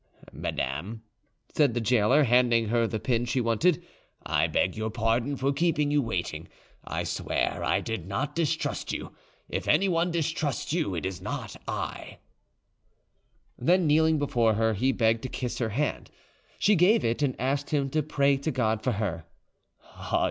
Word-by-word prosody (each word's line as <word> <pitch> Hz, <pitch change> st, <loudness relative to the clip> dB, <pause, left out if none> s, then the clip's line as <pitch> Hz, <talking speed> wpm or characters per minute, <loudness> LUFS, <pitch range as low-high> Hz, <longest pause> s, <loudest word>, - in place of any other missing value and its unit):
"Madame," 105 Hz, -, -4 dB, 0.5 s
said 140 Hz, -6 st, +3 dB
the -, -, +1 dB
gaoler, 120 Hz, +5 st, +3 dB
handing 120 Hz, -3 st, +3 dB
her 115 Hz, 0 st, +2 dB
the 110 Hz, -1 st, -3 dB
pin 120 Hz, +1 st, 0 dB
she 120 Hz, +2 st, -1 dB
wanted, 120 Hz, +8 st, +2 dB, 0.4 s
"I -, -, +2 dB
beg 95 Hz, -, 0 dB
your 110 Hz, 0 st, -2 dB
pardon 115 Hz, +5 st, 0 dB
for 135 Hz, +2 st, 0 dB
keeping 150 Hz, -1 st, +1 dB
you 145 Hz, 0 st, +3 dB
waiting. 90 Hz, -, -3 dB, 0.4 s
I -, -, -3 dB
swear -, -, -2 dB
I -, -, +1 dB
did 110 Hz, -7 st, -4 dB
not 135 Hz, +10 st, -2 dB
distrust 160 Hz, -2 st, -1 dB
you; -, -, -5 dB, 0.4 s
if -, -, -4 dB
anyone 175 Hz, +1 st, +3 dB
distrusts 160 Hz, -4 st, -2 dB
you, 155 Hz, -, 0 dB
it 80 Hz, -, -3 dB
is 95 Hz, -1 st, -4 dB
not -, -, -5 dB
I." -, -, -5 dB, 1.4 s
Then 175 Hz, +7 st, +3 dB
kneeling 160 Hz, +1 st, +4 dB
before 120 Hz, -6 st, +2 dB
her, 110 Hz, +1 st, +2 dB
he 130 Hz, +6 st, +1 dB
begged 115 Hz, -3 st, +2 dB
to 130 Hz, -, -5 dB
kiss 125 Hz, -1 st, -4 dB
her 115 Hz, -3 st, 0 dB
hand. 140 Hz, +7 st, -2 dB, 0.5 s
She 210 Hz, -, +3 dB
gave 200 Hz, +5 st, +4 dB
it, 115 Hz, +4 st, 0 dB
and 140 Hz, -3 st, 0 dB
asked 140 Hz, +3 st, -1 dB
him 140 Hz, -2 st, +1 dB
to 155 Hz, -, +1 dB
pray 140 Hz, -2 st, +2 dB
to 140 Hz, +4 st, -3 dB
God 110 Hz, -6 st, 0 dB
for -, -, +1 dB
her. 95 Hz, -6 st, -3 dB
125 Hz, 165 wpm, -27 LUFS, 110-150 Hz, 1.4 s, kneeling